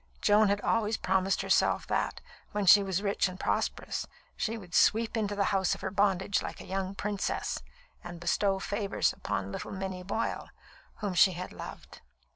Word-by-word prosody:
Joan 210 +1 +5
had 200 +1 +1
always 220 0 +1
promised 190 +1 +1
herself - - +2
that, - - -1 0.3
when 205 -1 0
she 205 +2 +9
was 195 0 -1
rich 200 -1 +1
and 185 0 -8
prosperous, - - -1 0.3
she 225 +1 -2
would 180 -5 -12
sweep 225 +5 +3
into 205 -2 -1
the 200 - +1
house 195 0 +2
of - - -13
her - - -3
bondage 200 0 +1
like - - -6
a - - -9
young 190 0 -3
princess, 205 -1 -2 0.4
and 175 -1 -8
bestow 195 +3 +1
favours 200 +1 0
upon 100 -1 -3
little - - -5
Minnie 190 -1 -4
Boyle, 200 +5 -3 0.5
whom 205 -3 -1
she 185 +2 +5
had 180 +1 -6
loved. - - -10
195 Hz, 175 wpm, -30 LUFS, 185-205 Hz, 0.5 s, she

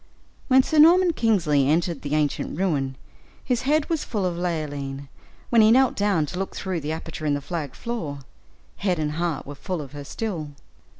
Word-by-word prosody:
When 260 -1 +6
Sir 310 +2 +1
Norman 345 +3 +7
Kingsley 170 - +2
entered 165 -1 +1
the 145 +1 -2
ancient 150 -1 -1
ruin, 145 -8 0 0.5
his 250 -2 0
head 305 0 +3
was 325 -3 -1
full 205 -5 -2
of 180 -1 -1
Leoline 145 -5 -3 0.4
when 235 -2 +6
he 215 - +6
knelt 260 +2 +4
down 200 -6 +1
to 180 +5 -6
look 195 - -4
through 190 -3 -2
the 150 0 -4
aperture 160 -1 -5
in 145 - +2
the - - -2
flagged 145 -2 -5
floor, 165 - -4 0.6
head 185 -3 0
and 150 -1 -1
heart 165 -1 -2
were 145 - -7
full 170 +5 -4
of 140 -3 -7
her 145 0 -7
still. 160 -3 -4
170 Hz, 190 wpm, -24 LUFS, 145-215 Hz, 0.6 s, Norman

